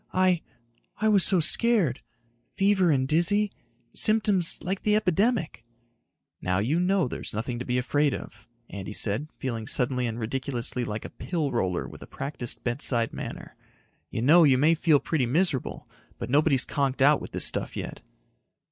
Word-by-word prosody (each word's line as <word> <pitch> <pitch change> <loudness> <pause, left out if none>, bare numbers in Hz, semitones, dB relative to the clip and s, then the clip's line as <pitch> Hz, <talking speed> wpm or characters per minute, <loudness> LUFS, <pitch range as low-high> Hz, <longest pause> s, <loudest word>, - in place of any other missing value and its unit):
I... 185 -2 +3 0.6
I 220 - 0
was 200 -4 +4
so 185 +2 +4
scared. 175 - +2 0.5
Fever 195 -2 +3
and 130 -4 +2
dizzy... 195 +7 +2 0.4
symptoms 205 -5 +2
like 190 +2 -3
the 210 0 +2
epidemic." 200 - 0 0.8
"Now 90 0 0
you 130 - 0
know 185 -2 +1
there's 120 - -7
nothing 120 +2 -3
to 125 - -5
be 125 0 -1
afraid 145 +3 +1
of," 105 +1 -11 0.2
Andy 100 +1 -7
said, 110 +8 +1
feeling 115 -5 -4
suddenly 125 0 0
and 115 0 -5
ridiculously 125 +1 -2
like 105 -2 -5
a - - -8
pill 160 -6 -3
roller 95 -7 -1
with - - -12
a - - -10
practiced 135 -4 -6
bedside 120 -1 0
manner. - - -8 0.5
"You 115 - -3
know 165 +6 +6
you 135 -4 +5
may 155 +5 +4
feel 155 -2 +3
pretty 140 -5 -1
miserable, 155 0 -1 0.3
but - - -6
nobody's 140 -2 +3
conked 135 -1 0
out 145 +1 +5
with - - -7
this - - +1
stuff - - -1
yet." - - -6
145 Hz, 165 wpm, -26 LUFS, 120-180 Hz, 0.8 s, know